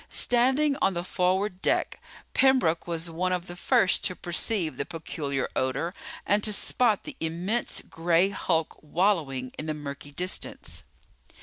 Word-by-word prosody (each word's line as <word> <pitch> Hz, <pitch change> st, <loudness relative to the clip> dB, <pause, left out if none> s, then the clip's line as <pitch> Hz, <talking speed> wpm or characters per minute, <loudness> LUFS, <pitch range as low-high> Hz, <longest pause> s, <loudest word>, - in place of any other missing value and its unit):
Standing 265 Hz, +4 st, +3 dB
on 195 Hz, -, +2 dB
the 170 Hz, -, -2 dB
forward 185 Hz, +1 st, 0 dB
deck, -, -, +1 dB, 0.3 s
Pembroke 255 Hz, -13 st, +3 dB
was 165 Hz, 0 st, -1 dB
one 175 Hz, +3 st, -1 dB
of 180 Hz, -1 st, -1 dB
the 175 Hz, -, -8 dB
first 180 Hz, +1 st, +3 dB
to 185 Hz, -, -1 dB
perceive 175 Hz, -1 st, -1 dB
the -, -, -1 dB
peculiar 145 Hz, -4 st, -3 dB
odor 135 Hz, +7 st, -1 dB, 0.3 s
and 205 Hz, +1 st, +2 dB
to 215 Hz, -, +3 dB
spot 215 Hz, +1 st, +2 dB
the 300 Hz, -3 st, -8 dB
immense 175 Hz, +9 st, -1 dB
gray 170 Hz, +3 st, +2 dB
hulk 165 Hz, -5 st, -1 dB
wallowing 150 Hz, -7 st, 0 dB
in 155 Hz, -, -4 dB
the 155 Hz, -, -1 dB
murky 145 Hz, -1 st, -7 dB
distance. 180 Hz, +6 st, -3 dB
175 Hz, 145 wpm, -27 LUFS, 160-200 Hz, 0.3 s, Standing